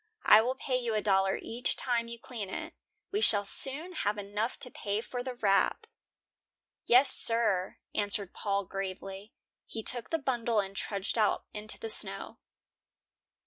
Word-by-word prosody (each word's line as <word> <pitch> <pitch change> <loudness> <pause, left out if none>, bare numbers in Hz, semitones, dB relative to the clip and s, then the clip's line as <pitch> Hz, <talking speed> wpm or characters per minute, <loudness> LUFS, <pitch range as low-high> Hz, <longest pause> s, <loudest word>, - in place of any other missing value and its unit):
I 215 - +8
will 250 +3 -1
pay 260 -1 -1
you 235 -3 -2
a 215 - +1
dollar 195 -1 +2
each 240 +3 -1
time 235 -2 -1
you 235 0 -7
clean 225 -4 -7
it. - - -6 0.4
We 410 +2 -1
shall 205 - +4
soon 295 - +2
have 210 - -1
enough 205 +3 -3
to 250 - -2
pay 205 0 -2
for 245 +2 -5
the 255 0 -5
wrap." 200 -5 +2 1.0
"Yes, 255 +2 +7
sir," 210 -5 +2 0.2
answered 205 -2 +1
Paul, 200 -1 -2
gravely. 195 +2 -6 0.4
He 220 - -6
took 240 0 -2
the 325 - 0
bundle 240 -6 0
and 195 -1 -3
trudged 200 +3 -3
out 215 - +1
into 215 0 -2
the 455 - -5
snow. 445 - -3
220 Hz, 160 wpm, -30 LUFS, 200-245 Hz, 1.0 s, I